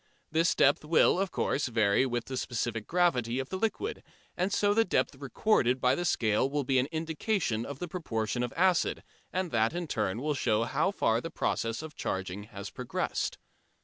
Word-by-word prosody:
This 165 Hz, +1 st, +2 dB
depth 140 Hz, +2 st, +4 dB
will, 160 Hz, +3 st, +4 dB
of 195 Hz, 0 st, 0 dB
course, 145 Hz, -4 st, 0 dB
vary 110 Hz, +1 st, +3 dB
with 120 Hz, -1 st, -2 dB
the 130 Hz, -, -5 dB
specific 120 Hz, -3 st, -2 dB
gravity 130 Hz, -10 st, +1 dB
of 135 Hz, 0 st, -3 dB
the -, -, -3 dB
liquid, 225 Hz, -, -2 dB, 0.3 s
and 185 Hz, +3 st, 0 dB
so 205 Hz, +1 st, +3 dB
the 225 Hz, +2 st, +4 dB
depth 185 Hz, -, 0 dB
recorded 135 Hz, -, +1 dB
by 125 Hz, 0 st, +3 dB
the 175 Hz, +6 st, -1 dB
scale 115 Hz, -3 st, +2 dB
will 145 Hz, 0 st, -1 dB
be 130 Hz, 0 st, +2 dB
an 130 Hz, -, +1 dB
indication 160 Hz, -, -1 dB
of 140 Hz, -, -6 dB
the 175 Hz, -, -5 dB
proportion 120 Hz, -, -2 dB
of 120 Hz, -1 st, -2 dB
acid, 180 Hz, 0 st, +2 dB, 0.3 s
and 185 Hz, -2 st, -2 dB
that 115 Hz, +3 st, +2 dB
in 175 Hz, 0 st, -2 dB
turn 110 Hz, -7 st, -1 dB
will 150 Hz, +3 st, 0 dB
show 115 Hz, -5 st, +1 dB
how 140 Hz, +9 st, +1 dB
far 115 Hz, -, +1 dB
the 165 Hz, -, -5 dB
process 115 Hz, -2 st, -2 dB
of 160 Hz, -1 st, -8 dB
charging 95 Hz, +1 st, -3 dB
has 100 Hz, -2 st, -8 dB
progressed. 125 Hz, -1 st, -2 dB
135 Hz, 190 wpm, -30 LUFS, 115-175 Hz, 0.3 s, depth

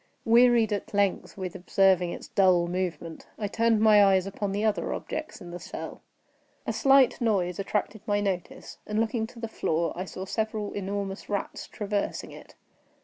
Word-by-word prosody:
Wearied 235 Hz, -2 st, +5 dB
at 205 Hz, 0 st, -4 dB
length 200 Hz, -1 st, 0 dB
with 185 Hz, -3 st, -4 dB
observing 185 Hz, -1 st, +2 dB
its -, -, -8 dB
dull 185 Hz, -3 st, +4 dB
movement, 170 Hz, -3 st, -4 dB
I 210 Hz, -, -2 dB
turned 225 Hz, +1 st, +2 dB
my 215 Hz, -2 st, +7 dB
eyes 190 Hz, -2 st, +4 dB
upon 200 Hz, 0 st, -3 dB
the 205 Hz, +2 st, -1 dB
other 215 Hz, -, 0 dB
objects 310 Hz, -, -6 dB
in 175 Hz, -, -9 dB
the 175 Hz, -, -6 dB
cell. -, -, -8 dB, 0.6 s
A -, -, -1 dB
slight 270 Hz, -4 st, +4 dB
noise 190 Hz, -6 st, 0 dB
attracted 210 Hz, +1 st, -2 dB
my 205 Hz, -1 st, +2 dB
notice, 190 Hz, -4 st, -4 dB
and, 210 Hz, 0 st, -1 dB
looking 225 Hz, 0 st, 0 dB
to 235 Hz, -, -14 dB
the 230 Hz, -, -4 dB
floor, 170 Hz, -6 st, -1 dB
I 185 Hz, -, -4 dB
saw 190 Hz, 0 st, -7 dB
several 215 Hz, 0 st, -3 dB
enormous 200 Hz, 0 st, -4 dB
rats 205 Hz, -1 st, -3 dB
traversing 205 Hz, -1 st, -3 dB
it. -, -, -13 dB
200 Hz, 170 wpm, -27 LUFS, 185-220 Hz, 0.6 s, my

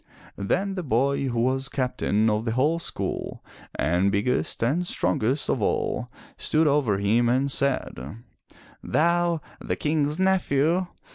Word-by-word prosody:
Then 190 Hz, -, 0 dB
the 190 Hz, -, -3 dB
boy 140 Hz, 0 st, +1 dB
who 120 Hz, -2 st, -1 dB
was 130 Hz, +3 st, 0 dB
Captain 125 Hz, -5 st, 0 dB
of 105 Hz, 0 st, +1 dB
the 115 Hz, -, -1 dB
whole 150 Hz, +7 st, +2 dB
school -, -, -4 dB, 0.3 s
and 90 Hz, +5 st, +1 dB
biggest 110 Hz, +4 st, 0 dB
and 160 Hz, +9 st, +1 dB
strongest 115 Hz, -, 0 dB
of 120 Hz, -, 0 dB
all -, -, -1 dB, 0.3 s
stood 160 Hz, +1 st, +2 dB
over 140 Hz, -9 st, +2 dB
him 110 Hz, +4 st, +2 dB
and 135 Hz, +3 st, +1 dB
said: 110 Hz, -, -2 dB, 0.7 s
"Thou, 170 Hz, 0 st, +1 dB, 0.2 s
the -, -, -1 dB
King's 150 Hz, +1 st, 0 dB
nephew! 180 Hz, -2 st, +2 dB
135 Hz, 135 wpm, -25 LUFS, 110-155 Hz, 0.7 s, whole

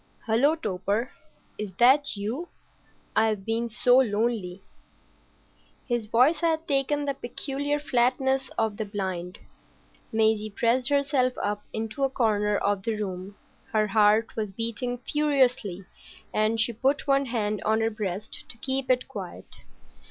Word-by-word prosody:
"Hullo, 255 Hz, +7 st, +3 dB
Torp! 210 Hz, -, -2 dB, 0.5 s
Is 210 Hz, -3 st, -4 dB
that 260 Hz, +4 st, +4 dB
you? 235 Hz, +12 st, -3 dB, 0.7 s
I've 215 Hz, -3 st, +2 dB
been 230 Hz, +1 st, -1 dB
so 245 Hz, +2 st, +4 dB
lonely." 210 Hz, -5 st, 0 dB, 1.2 s
His 240 Hz, -4 st, -1 dB
voice 255 Hz, +9 st, +4 dB
had 325 Hz, -1 st, 0 dB
taken 285 Hz, +1 st, +1 dB
the 280 Hz, -, 0 dB
peculiar 280 Hz, +3 st, -3 dB
flatness 265 Hz, -1 st, +1 dB
of 220 Hz, -2 st, 0 dB
the 220 Hz, -, -2 dB
blind. 185 Hz, -3 st, -4 dB, 0.7 s
Maisie 220 Hz, -1 st, +2 dB
pressed 235 Hz, +4 st, +1 dB
herself 280 Hz, -3 st, +2 dB
up 205 Hz, 0 st, -2 dB
into 220 Hz, +5 st, -3 dB
a 270 Hz, -, +3 dB
corner 210 Hz, -5 st, +1 dB
of 200 Hz, -1 st, 0 dB
the 225 Hz, +2 st, -2 dB
room. 190 Hz, -1 st, -5 dB, 0.4 s
Her 215 Hz, -1 st, +3 dB
heart 210 Hz, +1 st, +3 dB
was 210 Hz, -3 st, -3 dB
beating 230 Hz, +3 st, -2 dB
furiously, 255 Hz, -9 st, +1 dB, 0.5 s
and 215 Hz, +1 st, +1 dB
she 225 Hz, +1 st, +2 dB
put 270 Hz, +5 st, 0 dB
one 275 Hz, -1 st, +2 dB
hand 215 Hz, -3 st, -1 dB
on 220 Hz, +1 st, +2 dB
her 225 Hz, 0 st, +1 dB
breast 210 Hz, -1 st, -5 dB
to 240 Hz, -, -10 dB
keep 265 Hz, +2 st, -2 dB
it 255 Hz, -1 st, +2 dB
quiet. 200 Hz, -9 st, -8 dB
230 Hz, 135 wpm, -26 LUFS, 210-265 Hz, 1.2 s, that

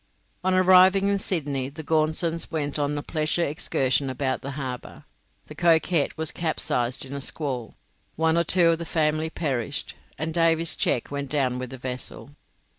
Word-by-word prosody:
On 185 Hz, 0 st, +2 dB
arriving 185 Hz, +1 st, +6 dB
in 200 Hz, 0 st, +1 dB
Sydney 145 Hz, -8 st, -1 dB
the 155 Hz, +3 st, -8 dB
Gaunsons 160 Hz, +2 st, 0 dB
went 150 Hz, -2 st, -2 dB
on 145 Hz, 0 st, 0 dB
a 145 Hz, -, -4 dB
pleasure 160 Hz, +2 st, 0 dB
excursion 135 Hz, -3 st, 0 dB
about 130 Hz, 0 st, -2 dB
the 140 Hz, +1 st, -6 dB
harbour, 130 Hz, -3 st, -6 dB, 0.4 s
the -, -, -10 dB
'Coquette' 165 Hz, -2 st, +2 dB
was 160 Hz, -1 st, -2 dB
capsized 135 Hz, -6 st, -1 dB
in 135 Hz, -, -9 dB
a 140 Hz, -, -4 dB
squall, 130 Hz, -5 st, -3 dB, 0.4 s
one 160 Hz, 0 st, +2 dB
or 170 Hz, -, +3 dB
two 170 Hz, 0 st, +4 dB
of 165 Hz, 0 st, +2 dB
the 170 Hz, -, -4 dB
family 155 Hz, 0 st, +1 dB
perished, 135 Hz, -9 st, -2 dB, 0.2 s
and 160 Hz, +2 st, -3 dB
Davy's 165 Hz, 0 st, +2 dB
cheque 120 Hz, -, 0 dB
went 140 Hz, -1 st, -4 dB
down 130 Hz, -4 st, 0 dB
with 130 Hz, -1 st, -5 dB
the 130 Hz, -, -8 dB
vessel. 130 Hz, +2 st, -6 dB
155 Hz, 170 wpm, -25 LUFS, 135-165 Hz, 0.4 s, arriving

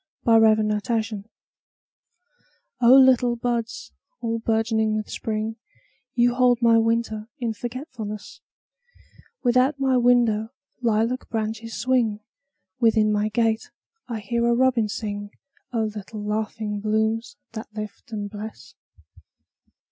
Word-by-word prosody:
A -, -, +1 dB
Song 220 Hz, -1 st, +5 dB
in 210 Hz, -, +1 dB, 0.2 s
Spring 215 Hz, -2 st, -4 dB, 1.6 s
O 240 Hz, 0 st, +6 dB
LITTLE 255 Hz, -2 st, +6 dB
buds 235 Hz, -1 st, -3 dB, 0.3 s
all 230 Hz, 0 st, -2 dB
bourgeoning 220 Hz, -1 st, +1 dB
with 215 Hz, 0 st, -3 dB
Spring, 220 Hz, 0 st, -3 dB, 0.6 s
You 240 Hz, 0 st, +4 dB
hold 245 Hz, -1 st, +3 dB
my 230 Hz, -1 st, +5 dB
winter 225 Hz, -1 st, 0 dB
in 235 Hz, -5 st, -2 dB
forgetfulness; 235 Hz, -3 st, -7 dB, 1.0 s
Without 255 Hz, +3 st, +3 dB
my 265 Hz, -1 st, +2 dB
window 235 Hz, -3 st, +3 dB, 0.3 s
lilac 230 Hz, +2 st, 0 dB
branches 225 Hz, 0 st, -3 dB
swing, 240 Hz, -5 st, +1 dB, 0.6 s
Within 220 Hz, -3 st, +4 dB
my 210 Hz, 0 st, +1 dB
gate 225 Hz, 0 st, 0 dB, 0.4 s
I 230 Hz, -3 st, -4 dB
hear 235 Hz, +3 st, 0 dB
a 235 Hz, -, +3 dB
robin 250 Hz, -3 st, +3 dB
sing—O 215 Hz, +3 st, -5 dB
little 215 Hz, 0 st, -6 dB
laughing 210 Hz, 0 st, -2 dB
blooms 220 Hz, +2 st, -1 dB
that 220 Hz, -1 st, -8 dB
lift 215 Hz, +2 st, -7 dB
and 205 Hz, -2 st, -3 dB
bless! 210 Hz, +2 st, -9 dB
225 Hz, 115 wpm, -24 LUFS, 215-240 Hz, 1.6 s, O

